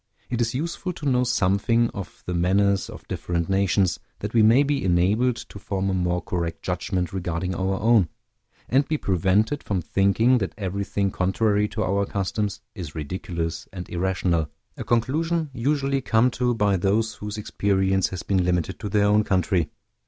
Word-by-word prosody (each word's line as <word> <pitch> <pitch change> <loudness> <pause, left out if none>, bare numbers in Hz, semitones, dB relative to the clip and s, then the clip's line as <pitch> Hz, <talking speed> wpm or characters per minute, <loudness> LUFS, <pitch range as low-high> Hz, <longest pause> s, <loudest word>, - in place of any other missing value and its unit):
It 120 -1 0
is 115 +1 0
useful 170 +5 -3
to 160 - -8
know 125 -2 +3
something 115 +1 +2
of 100 -3 -8
the 90 - -3
manners 95 +3 +2
of - - -11
different 85 -1 -2
nations, 95 -2 +2 0.2
that 105 +1 -5
we 115 - +5
may 115 +6 +6
be 145 0 0
enabled 100 +8 +2
to 100 - -10
form 95 0 -2
a - - -1
more 90 -1 0
correct 85 -2 -3
judgment 90 0 -2
regarding 90 -1 -2
our 95 +1 -1
own, 110 -5 +4 0.6
and 135 +3 +2
be 155 - 0
prevented 100 - +1
from 95 -4 -2
thinking 110 +8 +3
that 95 - -3
everything 100 0 -1
contrary 105 +3 +1
to - - -3
our 100 +1 0
customs 100 +1 -2
is 85 -7 -7
ridiculous 80 +1 -4
and 90 -2 -7
irrational, 90 -3 0 0.3
a - - -5
conclusion 155 +7 0
usually 135 +2 0
come 120 +1 +3
to 125 0 0
by 105 -3 +2
those 105 +5 +1
whose 105 +1 -6
experience 95 -2 +1
has 95 -2 -6
been 95 -2 +1
limited 90 -2 -1
to 105 - -4
their 100 0 +3
own 105 +1 +4
country. 90 -4 +1
100 Hz, 170 wpm, -24 LUFS, 90-115 Hz, 0.6 s, may